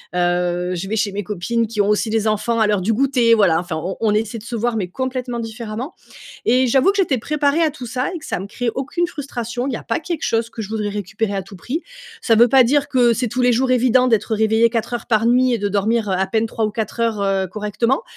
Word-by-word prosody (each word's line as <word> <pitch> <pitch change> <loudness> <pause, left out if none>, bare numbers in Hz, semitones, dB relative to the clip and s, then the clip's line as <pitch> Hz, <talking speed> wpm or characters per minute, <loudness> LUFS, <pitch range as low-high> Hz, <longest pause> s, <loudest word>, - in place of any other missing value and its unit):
Heu, 175 0 0
je 180 +2 -4
vais 215 - -2
chez 210 -1 0
mes 200 +1 -3
copines 215 +4 -1
qui 215 -1 -1
ont 200 - +1
aussi 210 +2 +1
des 220 0 +1
enfants 230 +2 0
à 215 - +4
l'heure 210 -1 +2
du 215 +5 +1
goûter, 250 -1 +3
voilà. 190 -7 +4
Enfin 175 -1 -4
on 175 +4 -4
on 215 -2 +2
essaie 220 +2 -1
de 210 - -10
se 240 +1 -5
voir 230 +1 -1
mais 190 -4 -2
complètement 255 +3 -3
différemment. 230 +4 -6 0.5
Et 255 +2 +3
j'avoue 265 +8 +4
que 400 - -3
j'étais 350 -10 +2
préparée 295 +5 +1
à 315 - +3
tout 275 -4 -9
ça 250 +3 -2
et 355 - -4
que 315 - -14
ça - - -2
me 195 - -6
crée 245 +3 -3
aucune 295 +6 -1
frustration. 250 -5 -4
Il - - -2
y - - -2
a - - -9
pas 230 - -1
quelque 330 -1 -4
chose 230 0 0
que 230 - -8
je 200 - -7
voudrais 215 -1 -2
récupérer 205 +1 -3
à 195 - -2
tout 195 +2 -13
prix. 275 - -4 0.4
Ça 230 - +3
veut 235 +2 +6
pas 260 +1 +6
dire 285 +3 +2
que 245 -4 +3
c'est 240 +2 -1
tous 250 +4 -3
les 245 0 +4
jours 255 +2 +1
évident 255 0 +4
d'être 220 -1 +1
réveillé 220 +2 +3
4 230 +1 -2
heures 240 - -4
par 225 -1 +2
nuit 250 +1 +3
et 235 - +1
de 205 0 -1
dormir, 210 +2 0
heu, - - +1
à 190 - +1
peine 220 +3 0
3 225 0 -2
ou - - -3
4 220 +1 -4
heures, 225 -3 0
heu, 195 -1 +1
correctement. 210 - -1
230 Hz, 270 wpm, -20 LUFS, 210-250 Hz, 0.5 s, veut